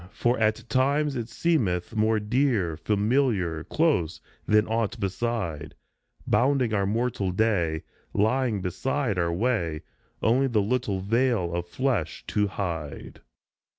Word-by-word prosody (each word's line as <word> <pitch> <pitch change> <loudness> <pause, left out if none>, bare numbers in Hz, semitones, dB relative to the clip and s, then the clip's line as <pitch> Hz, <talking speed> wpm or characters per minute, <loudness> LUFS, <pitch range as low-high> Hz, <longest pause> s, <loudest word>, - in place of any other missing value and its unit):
For 120 +3 0
at 110 -1 +1
times 140 +4 +1
it 120 -2 -4
seemeth 115 - 0
More 110 0 +2
dear, 105 - +1
familiar, 105 - +1
close 140 - +1 0.3
than 105 0 +4
aught 115 -1 -1
beside, 95 -6 -3 0.5
Bounding 130 -3 +2
our 100 -2 +1
mortal 110 -2 0
day, 90 -6 +1 0.3
lying 110 0 +1
beside 110 +3 -1
our 85 -1 +1
way, 85 -6 -1 0.4
Only 130 +4 +3
the 115 -4 +1
little 105 -4 -1
veil 115 -4 +1
of 85 0 -2
flesh 115 - -1
to 105 0 +1
hide. 85 -7 -5
110 Hz, 120 wpm, -26 LUFS, 90-125 Hz, 0.5 s, than